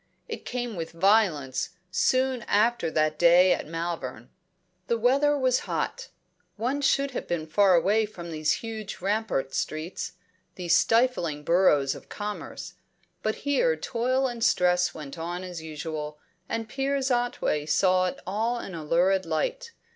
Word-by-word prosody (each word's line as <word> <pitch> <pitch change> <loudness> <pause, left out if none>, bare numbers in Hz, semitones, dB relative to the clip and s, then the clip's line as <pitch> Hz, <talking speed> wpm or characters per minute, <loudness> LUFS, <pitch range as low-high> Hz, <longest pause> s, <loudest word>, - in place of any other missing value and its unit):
It - - -7
came 245 -3 -3
with 165 -1 -5
violence 170 -8 +2 0.2
soon 255 +6 +2
after 215 -3 +2
that 155 -1 0
day 175 +2 +6
at - - -4
Malvern. 165 +1 -5 0.6
The 235 - +1
weather 280 +5 +3
was 255 -2 +2
hot; - - -3 0.5
one 255 +6 -1
should 280 0 +2
have 250 - -5
been 170 -2 -2
far 190 +4 +4
away 210 +5 +3
from 170 -5 -9
these 155 -1 0
huge 220 -2 -6
rampart 195 -9 -1
streets, 165 +7 -3 0.4
these 175 -2 +2
stifling 225 -11 +2
burrows 150 -6 +3
of - - -12
commerce. 210 0 -6 0.5
But 215 0 -1
here 480 - +2
toil 255 +2 0
and 240 -3 -3
stress 180 -7 +3
went 150 0 -8
on 175 +2 -4
as 180 -3 -6
usual, 155 -1 -5 0.3
and 225 -1 -2
Piers 270 +2 -1
Otway 240 -11 0
saw 185 +4 +3
it 180 - -5
all 225 +6 -1
in 195 - -7
a 165 -2 -6
lurid 180 +4 +2
light. 465 - -2
190 Hz, 145 wpm, -27 LUFS, 165-240 Hz, 0.6 s, day